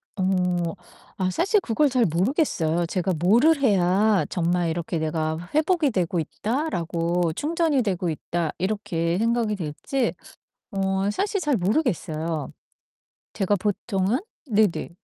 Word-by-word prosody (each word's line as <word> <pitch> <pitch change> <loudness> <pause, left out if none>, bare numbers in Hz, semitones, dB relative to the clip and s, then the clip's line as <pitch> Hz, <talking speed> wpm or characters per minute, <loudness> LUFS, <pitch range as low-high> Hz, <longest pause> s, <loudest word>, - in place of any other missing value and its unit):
어. 180 -3 0 0.4
아 185 -1 0
사실 395 - +2
그걸 285 +1 +2
잘 250 -3 +2
모르겠어요. 175 - +1
제가 185 +1 -1
뭐를 240 - +4
해야 200 -2 +3
정말 175 0 0
이렇게 170 +1 -2
'내가 155 0 -1 0.2
회복이 315 -1 +3
되고 180 -4 0
있다.'라고 175 - -1
'충전이 315 - +1
되고 185 -4 -1
있다.' 165 +1 -2
이렇게 175 -4 -1
생각이 230 0 +1
될지 195 - -2 0.6
어 195 0 0
사실 400 - -1
잘 295 -6 +1
모르겠어요. 170 - -1 0.8
제가 200 +1 +1
보통은 205 - 0 0.3
네네. 215 -5 +1
190 Hz, 260 characters per minute, -24 LUFS, 170-240 Hz, 0.8 s, 뭐를